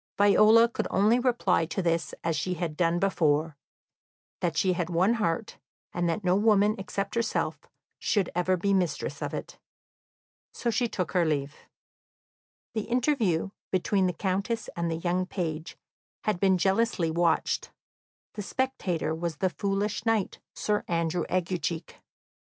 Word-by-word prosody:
Viola 215 +3 +6
could 235 - -3
only 215 +5 +3
reply 235 -9 +2
to 170 - -4
this 170 -2 0
as 165 -1 0
she 180 +5 -1
had 165 -2 -3
done 170 0 +2
before, 160 -5 +1 0.8
that 165 -3 -1
she 185 +3 +3
had 175 -1 -2
one 180 +6 +3
heart, 215 -1 -2 0.3
and 175 -1 0
that 170 +5 -2
no 180 0 +3
woman 210 0 +4
except 195 +1 -3
herself 230 -1 -1 0.4
should 200 -5 +1
ever 180 +1 +1
be 200 +3 +1
mistress 180 -4 -1
of - - -2
it. - - -7 1.0
So 235 - -1
she 240 +2 +1
took 185 -5 -3
her 180 -2 +3
leave. 145 -2 -1 1.2
The 220 -2 -2
interview 230 - +1 0.2
between 190 +1 +1
the 180 - -1
Countess 200 +5 -2
and 170 -1 -1
the 165 - -1
young 180 +2 -1
page 165 -4 -4 0.5
had 210 -5 0
been 190 -1 +4
jealously 190 -2 +1
watched; 170 0 +1 0.6
the 210 - -5
spectator 190 -9 -1
was 165 0 -3
the 185 -2 0
foolish 200 +2 -1
knight, 225 -4 0 0.2
Sir 210 -1 0
Andrew 170 0 0
Aguecheek. 175 -2 -2
185 Hz, 145 wpm, -28 LUFS, 170-210 Hz, 1.2 s, Viola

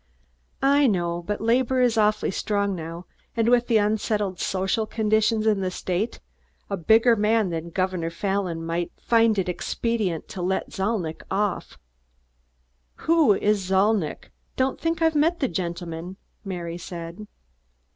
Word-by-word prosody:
"I 280 +1 +5
know, 175 -5 0
but 205 +4 -4
labor 250 +3 +2
is 245 -2 +3
awfully 210 -2 +2
strong 200 0 -1
now, 165 +1 -7 0.3
and 225 0 +2
with 245 0 +4
the 230 - +4
unsettled 210 -2 0
social 195 +3 0
conditions 220 0 +1
in 215 -2 +3
the 185 - 0
state, 185 +4 -3 0.5
a - - +1
bigger 225 +6 +4
man 210 -2 +2
than 165 0 -4
Governor 185 -1 -1
Fallon 180 -2 -2
might 170 +1 -2
find 230 -2 +3
it 190 - 0
expedient 190 -1 -2
to 185 - -6
let 190 +2 -1
Zalnitch 190 -5 -2
off." 205 0 -2 1.3
"Who 320 -10 +5
is 205 0 +1
Zalnitch? 190 -3 +1 0.2
Don't 260 0 0
think 330 0 0
I've 320 0 +4
met 320 +3 +2
the 270 - +1
gentleman," 175 -1 -5 0.3
Mary 175 -3 -5
said. 175 +4 -8
205 Hz, 140 wpm, -24 LUFS, 180-225 Hz, 1.3 s, I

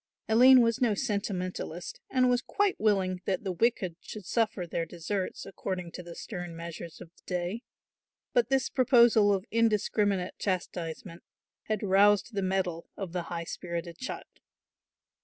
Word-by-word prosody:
Aline 250 +3 +8
was 230 +2 +1
no 230 -4 +3
sentimentalist 190 -6 -3
and 255 -1 +3
was 245 0 +3
quite 400 +7 0
willing 190 -4 +1
that 190 0 -1
the 195 - -2
wicked 185 -3 0
should 210 -3 -9
suffer 215 -3 0
their 170 0 -2
deserts 175 +4 -4
according 185 -2 -5
to 180 - -7
the 170 -1 -10
stern 175 -4 -6
measures 170 0 -8
of - - -10
the - - -24
day; 180 +5 -2 0.7
but 240 -1 +3
this 270 -2 +2
proposal 235 -5 +5
of 195 0 0
indiscriminate 210 -4 +1
chastisement 175 -2 -3 0.4
had 215 -1 -2
roused 205 +3 +4
the 200 - -1
mettle 185 -3 -1
of 190 -4 -5
the 180 -1 -2
high 170 -1 -3
spirited 170 0 -5
child. 260 - -5
195 Hz, 150 wpm, -29 LUFS, 175-225 Hz, 0.7 s, Aline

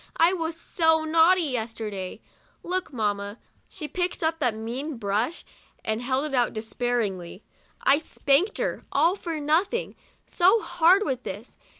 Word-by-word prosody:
I 335 +3 +5
was 330 -2 -3
so 320 -2 +2
naughty, 330 +3 +5
yesterday. 220 - -4 0.4
Look, 365 -1 -2
mamma" 205 -3 -2 0.2
— - - -39
she 310 -5 -6
picked 355 +1 -2
up 325 0 0
that 245 -7 +1
mean 250 +6 -4
brush, 220 +9 -1 0.4
and 220 +1 -1
held 260 +3 0
it 300 - -5
out 245 -2 +2
despairingly 215 -5 -3
— - - -35
" - - -35
I 280 +2 +5
spanked 315 +5 +1
her, - - -2
all 330 +6 +3
for 335 -5 -4
nothing, 330 +10 0 0.3
so 380 +6 +4
hard 370 0 +4
with 260 -3 -2
this. 205 +2 -8
285 Hz, 160 wpm, -26 LUFS, 225-330 Hz, 0.4 s, I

